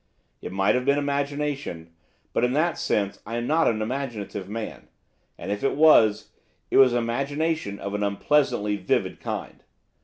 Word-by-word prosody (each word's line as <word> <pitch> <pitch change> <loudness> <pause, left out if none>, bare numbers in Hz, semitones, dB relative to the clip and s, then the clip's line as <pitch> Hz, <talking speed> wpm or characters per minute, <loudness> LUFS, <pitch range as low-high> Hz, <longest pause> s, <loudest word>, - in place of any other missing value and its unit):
It - - -6
might 95 +1 +2
have 125 - 0
been 140 +2 +2
imagination, 140 - -2 0.4
but, - - +1
in 125 +1 +2
that 160 +4 +1
sense, 100 -1 -1
I 115 +2 -6
am 120 - -2
not 160 +5 +2
an 110 -1 +1
imaginative 110 -6 -4
man; 110 +1 -6 0.5
and, - - -5
if 105 +3 -3
it 135 - +1
was, 135 -9 +5 0.4
it - - +3
was 130 -2 +7
imagination 140 0 -1
of 100 0 -5
an 105 - -2
unpleasantly 105 0 +1
vivid - - -1
kind. - - -6
120 Hz, 160 wpm, -25 LUFS, 105-145 Hz, 0.5 s, was